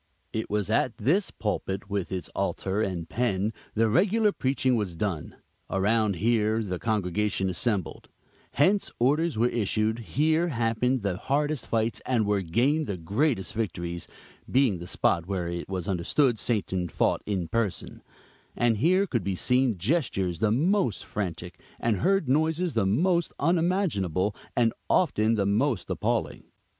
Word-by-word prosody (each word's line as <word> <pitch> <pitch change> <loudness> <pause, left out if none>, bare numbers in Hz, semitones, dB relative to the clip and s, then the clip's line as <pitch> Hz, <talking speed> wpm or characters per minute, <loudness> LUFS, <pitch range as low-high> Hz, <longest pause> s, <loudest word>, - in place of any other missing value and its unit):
It 110 - -3
was 105 -2 0
at 115 +2 +1
this 190 +9 +1
pulpit, 100 -2 -3
with 100 -2 -3
its 95 -1 -3
altar 95 +2 -2
and 90 -5 -2
pen, 110 -3 0 0.2
the 115 +1 +3
regular 205 - +3
preaching 130 -5 +1
was 100 -6 -2
done; 85 -3 -3 0.3
around 105 +1 +2
here 110 +2 +1
the 90 -4 -4
congregation 105 -2 0
assembled; 95 0 -2 0.4
hence 190 +9 +3
orders 150 +4 +2
were 120 +2 +3
issued; 110 0 0
here, 155 +8 +1
happened 120 -2 0
the 95 -3 -1
hardest 145 +2 -1
fights, 115 0 0
and 120 -4 +1
were 100 -1 +1
gained 130 - +1
the 95 - -3
greatest 100 - 0
victories, 85 -5 -3 0.4
being 125 -8 +2
the 85 - -7
spot 85 -1 +1
where 95 -3 -2
it 85 +1 -5
was 95 -3 -3
understood 110 - +1
Satan 95 -6 -1
fought - - +1
in 95 -5 -1
person; 110 +1 -2 0.5
and 120 -2 +2
here 185 - +3
could 120 - -2
be 95 0 -1
seen 125 +1 +2
gestures 95 - 0
the 110 - +2
most 155 - +1
frantic, 90 -4 -5 0.2
and 115 -3 +1
heard 195 - +2
noises 160 +4 +1
the 110 -4 +1
most 170 - +1
unimaginable, 150 - +1 0.2
and 115 -2 +3 0.2
often 110 +2 +3
the 100 -2 +1
most 110 +3 0
appalling. - - -1
110 Hz, 150 wpm, -27 LUFS, 95-135 Hz, 0.5 s, the